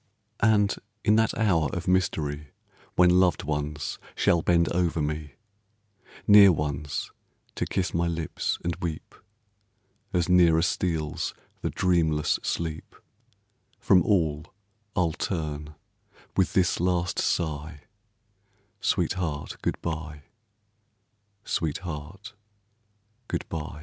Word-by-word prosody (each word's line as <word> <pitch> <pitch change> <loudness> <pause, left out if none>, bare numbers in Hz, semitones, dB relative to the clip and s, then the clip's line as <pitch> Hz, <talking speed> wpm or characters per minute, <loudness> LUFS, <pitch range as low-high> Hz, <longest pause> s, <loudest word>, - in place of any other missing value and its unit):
And 105 -2 +3 0.3
in 105 - +4
that 110 0 +2
hour 85 -9 +2
of 90 +1 -4
mystery, 75 -6 0 0.4
When 90 0 +5
loved 90 -2 +2
ones 75 -1 -3 0.2
shall 85 - +3
bend 85 0 +3
over 85 -2 0
me, 75 -2 -3 0.9
Near 100 -2 +9
ones 75 -2 -3 0.4
to - - -2
kiss 90 - -1
my 85 0 +1
lips 85 -2 -2
and 85 -1 -1
weep, 80 -3 -5 1.0
As 90 -1 +1
nearer 85 -3 +5
steals 80 -4 -1 0.3
the - - -1
dreamless 80 -5 +1
sleep, 80 -2 -4 0.8
From 90 - +5
all 80 -5 +1 0.5
I'll 85 -4 +1
turn 75 -4 -4 0.6
with 95 - +2
this 90 -2 +2
last 90 -1 0
sigh, 75 -2 -2 1.0
"Sweetheart, 80 -6 -1
good - - -1
by, 80 -3 -5 1.2
sweetheart, 80 +3 -4 0.9
good - - -3
by." 75 -2 -5
85 Hz, 105 wpm, -26 LUFS, 75-90 Hz, 1.2 s, Near